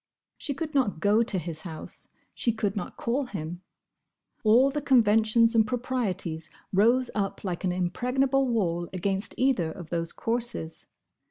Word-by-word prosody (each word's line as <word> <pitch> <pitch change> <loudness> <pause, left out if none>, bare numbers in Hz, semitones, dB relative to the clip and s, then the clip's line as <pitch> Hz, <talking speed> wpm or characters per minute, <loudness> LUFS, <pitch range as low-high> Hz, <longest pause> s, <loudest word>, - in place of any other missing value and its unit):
She 280 - -3
could 315 +1 -4
not 245 - +1
go 205 +5 +4
to 220 -4 0
his 165 -2 -4
house. 160 -3 -7 0.3
She 235 - +1
could 215 -2 -2
not 205 - -5
call 260 +4 0
him. 175 -5 -6 0.8
All 240 +5 +5
the 295 +1 -2
conventions 230 -2 +4
and 225 -1 +5
proprieties 195 -10 -2 0.2
rose 235 +6 +4
up 200 -2 -2
like 180 -3 -3
an 185 - +1
impregnable 250 +10 +1
wall 175 -8 0
against 195 +2 -2
either 245 -11 +2
of 170 0 -10
those 165 -1 -1
courses. 230 -8 -2
215 Hz, 150 wpm, -27 LUFS, 175-250 Hz, 0.8 s, All